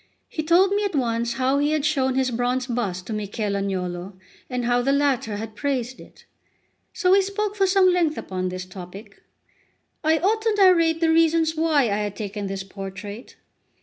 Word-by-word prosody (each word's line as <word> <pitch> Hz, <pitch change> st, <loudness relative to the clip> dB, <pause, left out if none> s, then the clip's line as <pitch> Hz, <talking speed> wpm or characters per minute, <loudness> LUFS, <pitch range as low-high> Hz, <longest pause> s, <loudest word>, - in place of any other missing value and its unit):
He 315 Hz, -, -4 dB
told 345 Hz, +5 st, +4 dB
me 410 Hz, +1 st, +1 dB
at 400 Hz, -5 st, -2 dB
once 235 Hz, -2 st, 0 dB
how 260 Hz, +3 st, +1 dB
he 295 Hz, +1 st, +1 dB
had 305 Hz, -2 st, 0 dB
shown 265 Hz, -4 st, +1 dB
his 260 Hz, -1 st, +1 dB
bronze 245 Hz, +2 st, -1 dB
bust 205 Hz, -8 st, -3 dB
to 225 Hz, -, -5 dB
Michel 210 Hz, 0 st, -3 dB
Agnolo, 185 Hz, -1 st, -3 dB, 0.4 s
and 250 Hz, -2 st, -2 dB
how 245 Hz, 0 st, +2 dB
the 270 Hz, +3 st, +1 dB
latter 275 Hz, -7 st, +1 dB
had 220 Hz, 0 st, -7 dB
praised 260 Hz, 0 st, -2 dB
it. -, -, -16 dB, 0.7 s
So 365 Hz, -2 st, +1 dB
we 395 Hz, +1 st, +6 dB
spoke 400 Hz, +1 st, -2 dB
for 390 Hz, -2 st, +2 dB
some 375 Hz, -1 st, +4 dB
length 335 Hz, -4 st, +1 dB
upon 185 Hz, -1 st, -3 dB
this 185 Hz, 0 st, -6 dB
topic. 185 Hz, +3 st, -11 dB, 0.8 s
I 315 Hz, +1 st, +3 dB
ought 425 Hz, +6 st, +1 dB
to 440 Hz, -1 st, +1 dB
narrate 335 Hz, -4 st, +4 dB
the 325 Hz, -1 st, +3 dB
reasons 325 Hz, 0 st, +3 dB
why 315 Hz, -3 st, +2 dB
I 205 Hz, -4 st, 0 dB
had 205 Hz, -1 st, -3 dB
taken 205 Hz, -1 st, -5 dB
this 195 Hz, 0 st, -4 dB
portrait. 195 Hz, +3 st, -8 dB
255 Hz, 185 wpm, -23 LUFS, 205-325 Hz, 0.8 s, we